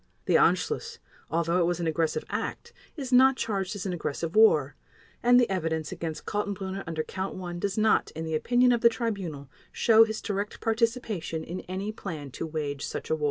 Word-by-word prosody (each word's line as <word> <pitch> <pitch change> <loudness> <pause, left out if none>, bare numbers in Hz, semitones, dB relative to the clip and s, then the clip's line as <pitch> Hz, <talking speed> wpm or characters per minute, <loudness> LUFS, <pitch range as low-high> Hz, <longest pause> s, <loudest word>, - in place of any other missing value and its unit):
The - - +1
Anschluss, - - +2 0.3
although 170 +2 +1
it 170 - +3
was 175 0 -1
an 170 - -2
aggressive 160 -1 0
act, 470 - -4 0.2
is 265 -3 -4
not 265 +1 +7
charged 195 -3 -2
as 200 - -5
an 185 - -2
aggressive 165 +1 -3
war, 155 -11 +5 0.5
and 245 +1 +6
the 245 - +4
evidence 160 -4 -2
against 165 -3 -5
Kaltenbrunner 195 -2 -3
under 160 -1 -2
Count 190 +3 -5
One 175 -2 -6
does 200 +1 -2
not, 215 0 +3
in 160 +1 -4
the 160 - -3
opinion 245 +10 +3
of 240 -1 +2
the 235 - +7
Tribunal, 195 - -4 0.2
show 225 -1 +6
his 220 -1 -2
direct 205 0 -3
participation 225 -8 -1
in 180 +2 -5
any 195 +3 -3
plan 160 -10 -7
to 165 - -5
wage 145 -3 -3
such - - -5
a - - +4
war. - - -8
190 Hz, 195 wpm, -27 LUFS, 160-220 Hz, 0.5 s, not